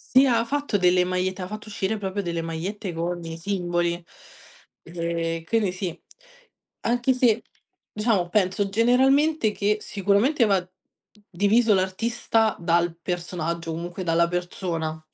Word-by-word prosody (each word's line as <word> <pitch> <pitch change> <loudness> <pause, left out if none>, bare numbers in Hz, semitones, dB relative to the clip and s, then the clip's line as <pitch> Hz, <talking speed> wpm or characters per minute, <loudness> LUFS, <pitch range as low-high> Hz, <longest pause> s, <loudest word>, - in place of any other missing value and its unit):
Sì, 265 - +8
ha 235 -3 +3
fatto 280 -4 -1
delle 180 0 +4
magliette, 185 +1 -1
ha - - -5
fatto 215 +2 -8
uscire 205 +1 -2
proprio 200 0 -3
delle 170 -2 -2
magliette 175 +4 -4
con 175 +1 -3
i 165 0 -6
simboli. 175 -2 -1 0.8
Eh 165 -1 -3
quindi 215 -3 +1
sì, 180 -2 -4 0.9
anche 245 +2 +2
se, 235 -3 +2 0.5
diciamo 210 -4 +1
penso 195 +1 +1
generalmente 260 +4 +3
che 210 +1 0
sicuramente 205 - +2
va 195 -4 +1 0.6
diviso 205 +4 +3
l'artista, 220 +3 +1
dal 170 0 +1
personaggio, 170 -1 -3
comunque 175 +3 -5
dalla 170 0 +3
persona. 170 -2 -3
185 Hz, 125 wpm, -24 LUFS, 170-220 Hz, 0.9 s, Sì